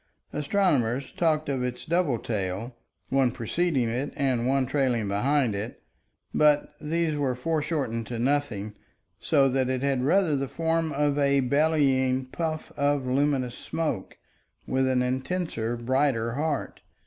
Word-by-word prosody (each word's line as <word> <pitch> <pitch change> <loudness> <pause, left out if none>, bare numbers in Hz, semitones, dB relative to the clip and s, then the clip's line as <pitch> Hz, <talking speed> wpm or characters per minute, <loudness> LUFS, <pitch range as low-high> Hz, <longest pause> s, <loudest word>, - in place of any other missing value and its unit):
Astronomers 140 - +1
talked 155 -2 +1
of 135 -2 -1
its 125 0 -4
double 165 -6 +1
tail, 105 +2 -3 0.3
one 135 -1 +3
preceding 130 +3 0
it 125 +5 -2
and 125 -4 0
one 135 0 +2
trailing 125 -5 0
behind 125 +4 +1
it, 105 +4 -5 0.5
but 150 -1 +3
these 160 0 0
were 140 -4 0
foreshortened 145 -5 -2
to 120 - -4
nothing, 120 -5 -1 0.5
so 140 -4 +3
that 130 0 +1
it 130 0 -1
had 135 -2 +1
rather 165 +1 +3
the 135 0 -1
form 165 +1 0
of 145 0 +1
a 140 -1 +3
bellying 135 -2 +2
puff 155 +3 -4
of 145 -2 +1
luminous 130 -1 +1
smoke 150 -12 -3 0.5
with 130 0 +1
an 130 -1 +2
intenser, 130 -3 -2
brighter 120 -1 +1
heart. 145 +3 -2
135 Hz, 135 wpm, -26 LUFS, 125-150 Hz, 0.5 s, one